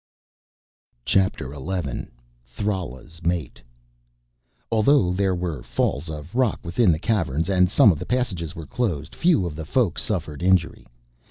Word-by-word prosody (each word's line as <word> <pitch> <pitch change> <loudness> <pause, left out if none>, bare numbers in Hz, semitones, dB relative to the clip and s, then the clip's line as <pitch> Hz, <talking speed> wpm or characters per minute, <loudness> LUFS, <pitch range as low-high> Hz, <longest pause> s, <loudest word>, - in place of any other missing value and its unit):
CHAPTER 95 -8 +1
ELEVEN 75 -1 -4 0.3
Thrala's 80 +1 -5
Mate 85 -5 -2 1.1
Although 110 -4 +4
there 95 0 +1
were 85 -7 -3
falls 70 +6 -1
of 75 +4 -7
rock 125 -3 +1
within 90 +3 +3
the 80 - +1
Caverns 85 - 0
and 90 -2 +4
some 100 - +6
of 80 - -3
the - - -6
passages 95 -10 -1
were 80 - -7
closed, 85 - -2
few 165 - +3
of 80 -3 -4
the 80 - -5
Folk 100 - +1
suffered 80 -8 -3
injury. 90 -2 +1
90 Hz, 140 wpm, -24 LUFS, 80-100 Hz, 1.1 s, some